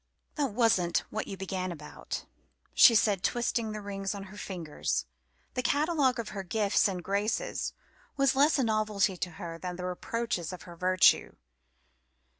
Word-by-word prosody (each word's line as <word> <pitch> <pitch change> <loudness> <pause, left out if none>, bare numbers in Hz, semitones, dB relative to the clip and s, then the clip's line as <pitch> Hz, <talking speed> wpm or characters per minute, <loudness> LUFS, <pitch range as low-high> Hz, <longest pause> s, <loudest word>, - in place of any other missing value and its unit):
"That 280 -7 -1
wasn't 205 -7 +2
what 215 - -3
you 195 - -6
began 185 -1 -3
about," 150 -3 -7 0.5
she 235 - +8
said, 205 -4 +3
twisting 235 0 0
the 215 0 -5
rings 195 0 -3
on 200 - -6
her - - -11
fingers. 170 - -3 0.5
The 250 - -1
catalogue 285 -1 +2
of 230 -2 -4
her 200 -2 -5
gifts 205 +3 +2
and 185 -3 -4
graces 210 - -1 0.5
was 275 -1 +3
less 290 +3 +4
a 270 - +2
novelty 215 -3 +1
to 180 - -2
her 165 0 -7
than 180 0 -5
the 180 0 -5
reproaches 180 -1 -2
to 180 - -5
her 175 - -11
virtue. 185 +1 +4
200 Hz, 160 wpm, -29 LUFS, 185-235 Hz, 0.5 s, she